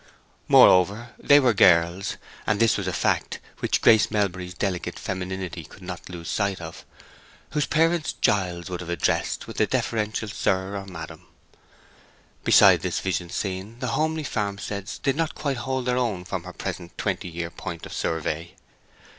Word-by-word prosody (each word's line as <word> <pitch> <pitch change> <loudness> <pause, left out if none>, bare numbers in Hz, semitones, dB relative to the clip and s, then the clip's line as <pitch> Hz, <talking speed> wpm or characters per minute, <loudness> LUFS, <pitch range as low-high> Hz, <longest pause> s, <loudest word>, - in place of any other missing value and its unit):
Moreover, 100 +6 +5
they 145 0 +6
were 125 -4 +3
girls—and 90 +3 +2
this 115 -1 +4
was - - -3
a - - 0
fact - - 0 0.2
which - - 0
Grace 110 -1 +6
Melbury's 90 -4 -2
delicate 95 -3 -2
femininity 95 -2 -4
could 95 - -15
not 90 -1 -7
lose 85 -2 -8
sight 100 -2 -1
of—whose 85 - -7
parents 165 0 +2
Giles 90 -4 0
would 90 -2 -4
have 85 - -8
addressed 85 - 0
with - - -4
a - - +4
deferential 110 0 -1
Sir 95 -1 -1
or 100 -1 -5
Madam. 80 -4 -9 1.2
Beside - - +7
this - - -1
visioned 90 -2 -2
scene 95 +3 -4
the 125 0 -3
homely 155 +5 0
farmsteads 100 -4 -3
did 135 -1 0
not 165 0 -1
quite 140 -3 -2
hold 130 +1 -2
their 125 0 +1
own 105 -8 -1
from 90 -1 -4
her 90 - -8
present 90 -2 -6
twenty 95 -1 -2
year 85 0 -5
point - - -7
of - - -9
survey. 80 +1 -3
95 Hz, 155 wpm, -25 LUFS, 90-115 Hz, 1.2 s, Beside